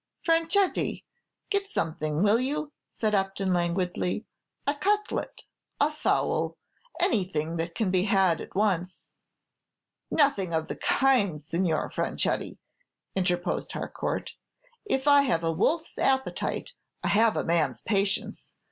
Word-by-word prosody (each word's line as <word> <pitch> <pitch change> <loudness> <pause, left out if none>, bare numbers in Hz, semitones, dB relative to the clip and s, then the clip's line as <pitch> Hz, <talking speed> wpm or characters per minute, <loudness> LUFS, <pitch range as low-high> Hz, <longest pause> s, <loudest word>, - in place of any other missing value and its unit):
"Franchetti, 330 +4 +2 0.5
get 400 -1 +1
something, 155 - -1
will 210 +2 +4
you?" 295 +3 -2 0.2
said 215 -2 -2
Upton, 195 -1 +1
languidly, 180 +3 -1 0.4
"a 285 - +2
cutlet, 415 +7 -1 0.4
a 295 +2 +3
fowl; 305 - 0 0.4
anything 170 -6 0
that 165 +1 -3
can 210 -5 0
be 185 0 +2
had 190 -5 +3
at - - -10
once." 185 -3 -1 1.0
"Nothing 200 - +2
of 160 0 -1
the - - -3
kind, 240 - +2
Signor 165 +1 -1
Franchetti," - - -1 0.6
interposed 180 -2 -1
Harcourt; - - -3 0.5
"if 270 -8 -1
I 285 -1 +7
have 245 -12 +1
a 165 - +1
wolfs 310 - 0
appetite, 265 0 0 0.3
I - - +1
have 220 +1 +4
a - - 0
man's 165 -1 0
patience. 200 -2 -1
195 Hz, 120 wpm, -27 LUFS, 175-275 Hz, 1.0 s, I